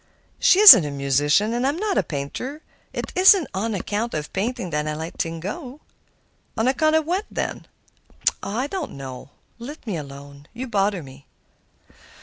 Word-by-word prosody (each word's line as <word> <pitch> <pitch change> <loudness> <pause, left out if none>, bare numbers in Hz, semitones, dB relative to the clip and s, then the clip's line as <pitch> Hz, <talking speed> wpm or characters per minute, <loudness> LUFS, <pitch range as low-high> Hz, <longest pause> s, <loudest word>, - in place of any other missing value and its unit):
"She 370 - +5
isn't 250 - +11
a 150 - -4
musician, 145 - +1
and 245 +2 0
I'm 285 +3 -1
not 410 +1 -1
a - - +3
painter. 205 - -6 0.3
It - - -6
isn't 370 -2 +6
on 210 +3 -2
account 210 +3 -3
of 150 -1 -5
painting 215 -2 -3
that 150 0 -2
I 150 - -3
let 160 +2 -7
things 165 0 -5
go." 265 - -7 0.8
"On 225 - +1
account 310 +4 +2
of 315 -1 +2
what, 370 +6 -2
then?" - - -5 0.7
"Oh! 200 +3 -5
I 255 - 0
don't 375 +6 -5
know. 130 -1 -9 0.3
Let 280 +6 -10
me 210 -6 -3
alone; 140 0 -11
you 255 +3 -5
bother 200 -5 0
me." 135 0 -15
205 Hz, 170 wpm, -22 LUFS, -, 0.8 s, isn't